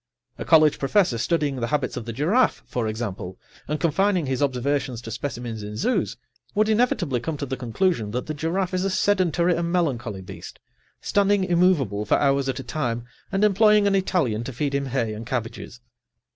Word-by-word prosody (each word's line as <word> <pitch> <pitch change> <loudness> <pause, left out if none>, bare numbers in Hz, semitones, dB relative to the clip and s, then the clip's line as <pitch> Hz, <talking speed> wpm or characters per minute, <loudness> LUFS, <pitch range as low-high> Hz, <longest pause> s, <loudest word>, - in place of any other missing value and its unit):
A - - -4
college 155 -2 +5
professor 140 - +2
studying 145 +1 0
the 115 -2 -2
habits 140 -1 -1
of 115 - -5
the 115 - -4
giraffe, 170 - +1
for 120 -3 -2
example, 105 -5 -5 0.3
and 150 +1 -2
confining 180 +2 +2
his 130 -1 -2
observations 135 -1 0
to 115 - -7
specimens 120 -2 -5
in 105 +1 -6
zoos, 250 - 0 0.4
would 215 +1 +3
inevitably 210 - +1
come 150 +5 -4
to 140 - -3
the 130 - -3
conclusion 125 - 0
that 125 +4 -3
the 155 - -4
giraffe 175 +5 -2
is 185 0 0
a 195 - +1
sedentary 180 -3 +2
and 170 0 -2
melancholy 125 - -1
beast, 95 - -10 0.4
standing 200 -1 +2
immovable 170 - +2
for 105 - +2
hours 140 -1 +2
at 130 - -2
a - - -5
time 120 -3 -3 0.3
and 195 +1 +1
employing 210 0 +5
an 200 - +3
Italian 160 - +1
to 135 - -5
feed 140 +3 -2
him 140 0 -1
hay 120 -4 -1
and 110 +2 -7
cabbages. 125 0 -5
140 Hz, 185 wpm, -24 LUFS, 120-180 Hz, 0.4 s, college